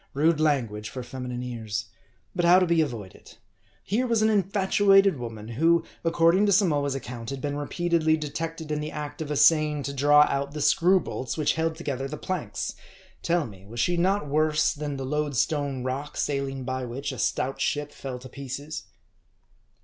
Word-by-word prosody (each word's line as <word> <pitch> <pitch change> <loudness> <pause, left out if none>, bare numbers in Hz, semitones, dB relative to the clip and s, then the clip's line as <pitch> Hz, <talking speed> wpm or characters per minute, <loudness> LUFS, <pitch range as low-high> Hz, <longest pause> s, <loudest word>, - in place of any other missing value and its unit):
Rude 155 +2 +3
language 115 -9 0
for 130 - -6
feminine 125 0 -5
ears; 115 -4 -4 0.5
but 175 - 0
how 175 +1 +7
to 185 - +4
be 170 -2 +3
avoided? 115 -10 -6 0.5
Here 245 +5 0
was 230 -2 +2
an 220 - +4
infatuated 195 -2 +3
woman, 115 -2 -7
who, 165 +8 +3 0.2
according 170 +4 +3
to - - +3
Samoa's 150 -8 +2
account, 120 -3 -6
had 135 - -4
been 145 +1 -3
re 145 0 -4
peatedly 165 -2 +1
detected 160 +1 -5
in 150 - 0
the 150 0 -4
act 150 0 -6
of 155 - -4
essaying 150 0 +4
to 140 - -4
draw 145 +2 +6
out 140 +1 -2
the 150 - -5
screw 175 +5 +4
bolts 130 -5 -5
which 155 - +2
held 160 0 -1
together 135 -5 -3
the 150 +2 -6
planks. 165 - -3 0.5
Tell 170 -2 +1
me; 95 -4 -12
was 115 +3 -7
she 175 +8 +2
not 185 -1 +1
worse 155 +1 +2
than 145 -1 -4
the 135 - -4
Load 150 +1 -1
Stone 140 -2 0
Rock, 135 +3 -4
sailing 135 -2 -2
by 130 0 -3
which 125 +4 -4
a 130 - -7
stout 135 +2 -1
ship 145 0 -1
fell 130 -2 -6
to 125 +1 -11
pieces 140 +4 -6
150 Hz, 185 wpm, -26 LUFS, 130-165 Hz, 0.5 s, how